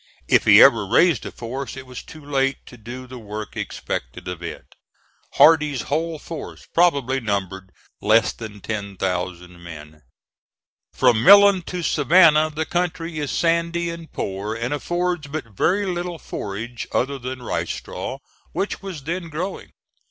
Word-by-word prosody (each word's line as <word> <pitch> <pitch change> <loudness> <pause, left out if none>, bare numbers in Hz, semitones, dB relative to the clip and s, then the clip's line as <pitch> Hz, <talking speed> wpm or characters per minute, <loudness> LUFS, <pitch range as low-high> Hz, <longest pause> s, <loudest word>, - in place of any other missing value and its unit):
If - - +4
he - - +9
ever 105 -4 +5
raised 170 - +3
a - - -7
force 130 +4 -6
it 130 - -8
was 125 -1 -8
too 155 -2 -13
late 135 -1 0
to - - -13
do 120 +3 -9
the 125 0 -10
work 105 -1 -7
expected - - -5
of 90 -1 -5
it. 85 - -8 0.6
Hardee's 150 -5 +5
whole 160 +3 -2
force 160 +1 -8
probably 140 -7 +2
numbered 95 -4 -3 0.3
less 110 +2 +4
than 105 -3 -9
ten 100 -2 -5
thousand 90 -1 -4
men. 75 -2 -11 0.9
From 120 -4 +3
Millen 200 0 +8
to 180 -1 -4
Savannah 155 0 +5
the 155 +1 -3
country 170 -2 -2
is 145 -2 -2
sandy 170 0 0
and 170 -1 -10
poor, 100 +3 -4
and 120 +4 -2
affords 175 +1 -2
but 140 -8 -6
very 195 - +2
little 175 -2 -3
forage 115 -1 -6
other 140 +1 -1
than 130 0 -6
rice - - -2
straw, - - -6 0.4
which 200 - -2
was 185 -8 -7
then 170 +3 -4
growing. 175 +5 -5
135 Hz, 150 wpm, -22 LUFS, 110-170 Hz, 0.9 s, he